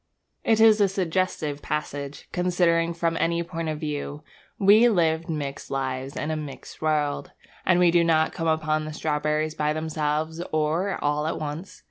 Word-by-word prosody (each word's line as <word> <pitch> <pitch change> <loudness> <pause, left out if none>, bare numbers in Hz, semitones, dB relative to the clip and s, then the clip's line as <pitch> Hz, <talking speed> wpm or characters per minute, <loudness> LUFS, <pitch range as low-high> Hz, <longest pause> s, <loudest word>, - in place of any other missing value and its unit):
It 225 -1 +3
is 220 -1 +6
a 200 - +6
suggestive 180 -5 -1
passage, 145 -2 -4
considered 170 -2 +1
from 165 -1 0
any 170 0 +1
point 165 -1 -4
of 155 -1 -3
view 150 -1 -4 0.3
We 210 +4 +6
live 165 -5 +1
mixed 145 -3 -4
lives 135 0 -3
in 155 - -2
a - - -1
mixed 150 -3 -8
world, 155 +3 0 0.3
and 185 -1 +5
we 175 -1 +5
do 170 0 +4
not 160 -1 +2
come 165 -1 -2
upon 155 -1 +1
the 155 - -6
strawberries 155 0 -1
by 150 -1 0
themselves 155 +1 -2
or 155 +5 0
all 150 +1 +1
at 160 - -2
once. 155 +5 -6
160 Hz, 165 wpm, -25 LUFS, 150-170 Hz, 0.3 s, is